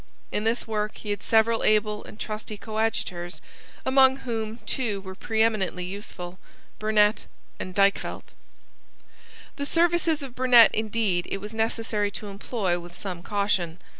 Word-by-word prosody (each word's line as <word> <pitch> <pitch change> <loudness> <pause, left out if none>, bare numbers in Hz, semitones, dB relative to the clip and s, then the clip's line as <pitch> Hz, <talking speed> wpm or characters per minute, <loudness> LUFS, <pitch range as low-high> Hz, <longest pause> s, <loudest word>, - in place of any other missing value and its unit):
In 210 - -1
this 230 +2 +1
work 215 -1 -2
he 210 - -5
had 205 - -2
several 225 0 +3
able 210 0 +2
and 215 - -12
trusty 215 0 -5
coadjutors, 215 -5 -2 0.5
among 265 0 +6
whom 225 -2 -3
two 225 -7 -1
were 190 -1 -8
preeminently 215 -3 0
useful, 185 -1 -7 0.4
Burnet 215 0 +3 0.3
and 185 0 -6
Dykvelt. 200 0 +1 1.2
The 285 - -2
services 335 -2 +2
of 265 -3 -7
Burnet 250 -3 +7
indeed 215 -5 0
it - - -2
was 210 +2 -8
necessary 220 -2 0
to 210 - -8
employ 195 -3 -2
with 175 0 -11
some 180 -3 -5
caution. 190 -4 0
215 Hz, 135 wpm, -26 LUFS, 195-225 Hz, 1.2 s, Burnet